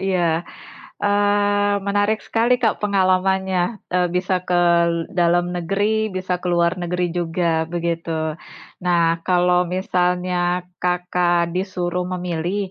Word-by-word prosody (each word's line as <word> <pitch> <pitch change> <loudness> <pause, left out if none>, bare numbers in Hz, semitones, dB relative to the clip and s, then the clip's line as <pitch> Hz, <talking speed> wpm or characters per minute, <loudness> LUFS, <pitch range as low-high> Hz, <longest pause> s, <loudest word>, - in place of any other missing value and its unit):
Iya, 175 -3 0 0.6
eee, 205 0 +2
menarik 205 +2 +1
sekali 240 +2 +1
Kak 220 - +2
pengalamannya, 190 0 +1
eee, 180 -1 +1
bisa 180 0 0
ke 175 -1 +2 0.5
dalam 175 -1 +2
negeri, 205 +4 0
bisa 185 -1 -2
ke 180 - -7
luar 170 +1 +2
negeri 180 0 -1
juga, 165 -1 -1
begitu. 165 -2 -3 0.5
Nah, 170 -2 +2
kalau 180 0 +3
misalnya 180 0 0 0.2
Kakak 180 -1 +1
disuruh 180 -1 -2
memilih, 180 +2 -2
180 Hz, 110 wpm, -21 LUFS, 175-195 Hz, 0.6 s, kalau